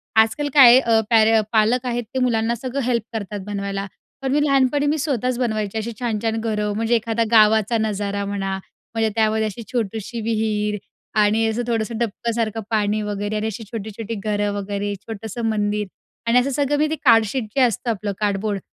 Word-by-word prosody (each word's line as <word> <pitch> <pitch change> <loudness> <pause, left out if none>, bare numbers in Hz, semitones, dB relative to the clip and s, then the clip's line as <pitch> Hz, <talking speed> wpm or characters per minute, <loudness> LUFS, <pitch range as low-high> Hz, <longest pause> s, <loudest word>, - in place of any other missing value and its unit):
आजकाल 220 +7 +3
काय 275 -4 +9
आहे 255 - +8
अ, 230 -3 +3
पॅरे 225 -1 +5
अ, 220 - +5
पालक 230 +4 +3
आहेत 240 -1 -1
ते 260 - 0
मुलांना 235 -2 +1
सगळं 255 +3 -4
हेल्प 235 -3 +1
करतात 205 -2 -4
बनवायला, 200 -1 -3 0.4
पण 265 - -1
मी 295 +2 +3
लहानपणी 275 0 +2
मी 300 +2 +1
स्वतःच 255 -4 -1
बनवायची 215 -3 -1
अशी 220 +2 -3
छान-छान 225 -2 -1
घरं, 210 -2 -1
म्हणजे 225 +2 +1
एखादा 230 0 0
गावाचा 220 0 +5
नजारा 205 -2 -2
म्हणा, 195 -1 -2 0.4
म्हणजे 225 -1 +2
त्यामध्ये 220 0 +2
अशी 215 +2 -5
छोटीशी 225 -1 -3
विहीर 215 -1 -1 0.4
आणि 215 +2 +3
असं 220 +2 -1
थोडंसं 230 -1 -1
डबकासारखं 230 0 -2
पाणी 215 -1 +1
वगैरे 205 0 -3
आणि 215 +1 -1
अशी 220 +1 -5
छोटी-छोटी 220 0 -5
घरं 205 0 -1
वगैरे, 205 0 -3
छोटंसं 220 +3 -7
मंदिर 210 -1 0 0.4
आणि 240 +2 +5
असं 255 +2 0
सगळं 290 +1 +1
मी 305 - +2
ते 315 - -1
कार्डशीट 230 +1 +4
जे 270 - +3
असतं 240 -1 +1
आपलं, 210 -2 -2
कार्डबोर्ड, 205 0 -1
220 Hz, 180 wpm, -21 LUFS, 210-235 Hz, 0.4 s, काय